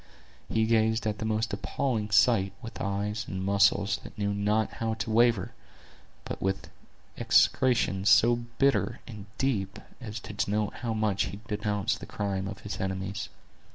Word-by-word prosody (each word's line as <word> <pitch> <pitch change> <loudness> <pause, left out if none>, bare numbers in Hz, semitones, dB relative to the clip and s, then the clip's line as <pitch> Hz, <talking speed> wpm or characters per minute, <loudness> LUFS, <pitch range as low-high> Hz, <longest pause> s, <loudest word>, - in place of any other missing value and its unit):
He 110 0 +2
gazed 110 0 +2
at 105 0 -1
the 110 - -3
most 110 0 -1
appalling 115 -7 -2
sight 100 -2 +4
with 115 -3 -8
eyes 105 +2 -2
and 95 0 -4
muscles 100 0 +3
that - - -12
knew 100 -1 0
not 105 +2 0
how 110 -1 0
to 110 - -4
waver, 115 -4 +3 0.7
but - - -6
with 95 0 -2 0.5
execrations 115 -7 +3
so 120 +1 +6
bitter 120 +4 0
and 105 -4 -9
deep 105 -8 -1 0.2
as 110 -3 -6
to - - -8
denote 105 +1 -1
how 115 -2 -3
much 105 -3 +1
he 100 - -7
denounced 105 -2 -1
the - - -9
crime 95 -1 -2
of 95 0 -7
his 105 - -6
enemies. 95 +2 -3
105 Hz, 155 wpm, -28 LUFS, 100-115 Hz, 0.7 s, so